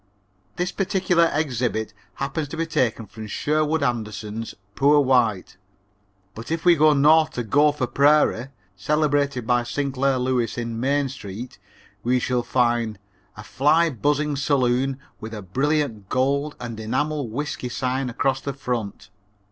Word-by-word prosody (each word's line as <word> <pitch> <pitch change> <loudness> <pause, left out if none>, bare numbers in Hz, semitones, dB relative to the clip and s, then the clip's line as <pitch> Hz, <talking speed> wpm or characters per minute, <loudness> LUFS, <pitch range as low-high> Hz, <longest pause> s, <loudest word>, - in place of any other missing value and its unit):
This 180 +1 -2
particular 180 -3 +2
exhibit 125 -7 -1 0.2
happens 145 +2 -3
to 160 - -7
be 165 - 0
taken 120 -8 0
from 110 +2 -9
Sherwood 155 +6 0
Anderson's 110 -2 -3 0.2
Poor 145 +5 +4
White, 120 -10 +1 0.8
but 110 +2 -9
if 165 +1 -2
we 175 -1 +7
go 155 0 +5
north 155 +2 +4
to 120 - -3
Gopher 145 +3 +2
Prairie, 140 -2 +3 0.3
celebrated 140 +1 0
by 120 +1 +2
Sinclair 135 +1 -1
Lewis 125 -3 -1
in 115 -1 -3
Main 140 +2 +1
Street, 120 -2 -8 0.4
we 125 +4 +1
shall 125 0 0
find: 120 -3 0 0.4
"A 110 - -8
fly 155 +8 +2
buzzing 145 +4 0
saloon 135 -1 +1 0.2
with 110 0 -7
a 105 - -7
brilliant 130 - -1
gold 140 +3 0
and 115 -2 -6
enamel 135 +4 -2
whisky 130 +1 -4
sign 130 +1 -2
across 135 +2 0
the 140 - -4
front. 120 -8 -4
130 Hz, 140 wpm, -23 LUFS, 120-150 Hz, 0.8 s, we